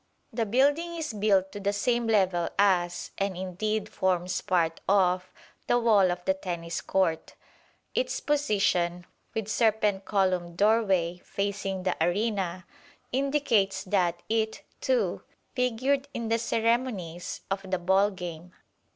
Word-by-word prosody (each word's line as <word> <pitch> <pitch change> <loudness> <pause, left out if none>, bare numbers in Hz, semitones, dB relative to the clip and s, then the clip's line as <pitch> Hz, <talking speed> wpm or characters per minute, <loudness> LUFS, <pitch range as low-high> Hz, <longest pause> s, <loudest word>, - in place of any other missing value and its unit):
The 225 -1 -1
building 290 +9 +2
is 315 -7 -4
built 200 -2 +2
to 205 - -7
the 200 0 0
same 235 +3 0
level 190 -6 +2
as, 180 -3 +2
and 195 -2 -1
indeed 200 +4 -2
forms 185 -1 -1
part 165 -3 0
of, 185 -2 +2 0.4
the 240 - +3
wall 215 -6 +4
of 175 0 -3
the 190 - +3
Tennis 170 -3 -4
Court. 175 -4 0 0.6
Its - - 0
position, 195 -11 +1 0.3
with 220 -2 -2
serpent 215 -3 +1
columned 185 -4 0
doorway, 195 -5 +2
facing 195 -1 -3
the 185 - 0
arena, 185 -2 -1 0.5
indicates 255 -8 +1
that 175 -3 0
it, 220 0 -1 0.2
too, - - 0 0.3
figured 260 +3 0
in 230 -1 -3
the 230 0 +2
ceremonies 225 -7 -1
of 195 0 0
the 185 - +1
ball 190 +3 +3
game. 180 -2 -8
195 Hz, 130 wpm, -28 LUFS, 180-225 Hz, 0.6 s, wall